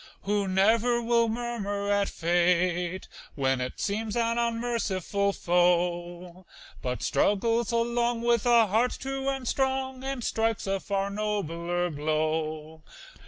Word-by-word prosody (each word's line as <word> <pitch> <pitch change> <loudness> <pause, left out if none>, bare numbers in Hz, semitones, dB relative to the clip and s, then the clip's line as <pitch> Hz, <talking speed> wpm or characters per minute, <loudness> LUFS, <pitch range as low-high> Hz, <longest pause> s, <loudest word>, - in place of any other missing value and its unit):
Who 205 0 0
never 225 +6 +3
will 235 -1 +2
murmur 220 -4 -3
at 200 -1 +2
fate, 175 +1 +1 0.3
when 135 -2 0
It 125 - -5
seems 215 +1 -2
an 230 0 +1
unmerciful 230 -4 -1
foe, 175 0 0 0.3
But 125 -1 -3
struggles 230 +3 +1
along 235 0 0
with 235 -1 +2
a 235 -2 +6
heart 225 +5 +1
true 270 0 -3
and 270 -2 -3
strong, 265 0 -1
And 270 -2 -3
strikes 225 -1 0
a 195 0 -1
far 200 0 -2
nobler 175 -4 -2
blow. 155 +1 -2
200 Hz, 120 wpm, -27 LUFS, 175-235 Hz, 0.3 s, a